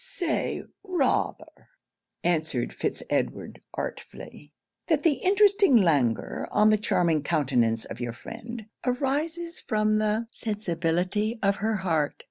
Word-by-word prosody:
'Say 345 -4 -2 0.2
rather,' 355 -10 -1 0.5
answered 160 -7 0
Fitz - - -2
Edward - - -2
artfully, 145 0 -7 0.4
'that 310 -3 +2
the 310 -4 +3
interesting 395 - +5
languor 145 - +1
on 215 0 +4
the 215 - +4
charming 170 -7 +2
countenance 130 -8 +1
of - - -8
your 120 -1 -2
friend, 230 - -8 0.2
arises 300 +7 -1
from 215 -1 +1
the 215 +2 0
sensibility 200 +1 -1
of 200 0 +2
her 215 +2 0
heart. 155 -4 +1
215 Hz, 115 wpm, -27 LUFS, 160-265 Hz, 0.5 s, interesting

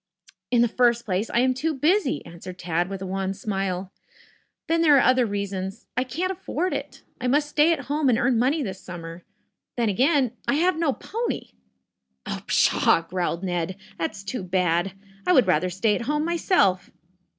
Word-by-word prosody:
"In 240 -1 +4
the - - +3
first 235 0 +2
place, 195 +2 -1
I 235 - +2
am 255 0 +3
too 305 +5 -2
busy," 310 +2 +1
answered 170 +2 -10
Tad 175 0 -1
with 195 -1 -5
a - - -4
wan 190 +1 -2
smile. 195 -2 -3 0.7
"Then 330 0 +1
there 300 -4 +6
are - - +5
other 255 -1 +4
reasons. 200 0 -4
I 250 - +1
can't 340 +9 -2
afford 365 -1 -2
it. - - -6 0.2
I 250 - -1
must 290 +3 +2
stay 300 +2 +4
at 320 -4 0
home 285 +1 0
and 235 - +3
earn 245 -1 +2
money 280 +5 +2
this 190 -5 -6
summer. 170 -1 -8 0.5
Then, 235 -2 +2
again, 260 - +2 0.2
I - - +2
have 360 +4 +2
no 325 -3 +1
pony." 460 - -4 0.8
"Oh - - -4
pshaw!" 165 - +3
growled 180 -1 -2
Ned. 180 0 -2 0.2
"That's 170 +4 -3
too 200 +4 -4
bad. 180 0 0 0.3
I 360 - +5
would 255 -8 +6
rather 180 0 +2
stay 190 +4 +1
at - - -1
home 300 +1 0
myself." 325 - +2
230 Hz, 185 wpm, -24 LUFS, 185-290 Hz, 0.8 s, there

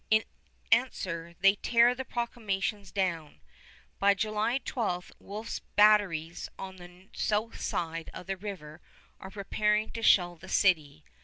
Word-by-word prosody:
In 220 0 +4 0.5
answer, 180 -8 0
they 195 0 +7
tear 235 +3 +4
the 260 +1 -5
proclamations 215 -5 -3
down. 170 -6 -2 0.6
By 200 0 +4
July 215 +4 0
12 205 -10 -3
Wolfe's 215 +3 -6 0.2
batteries 200 -6 +3
on 190 -1 -7
the 180 +2 -14
south 215 +2 -1
side 165 -1 -3
of - - -9
the 195 - -2
river 175 -6 -8 0.4
are 190 - -9
preparing 210 +2 0
to 230 - -6
shell 175 -5 +4
the 190 +3 -12
city. 155 -5 +2
195 Hz, 135 wpm, -29 LUFS, 175-215 Hz, 0.6 s, they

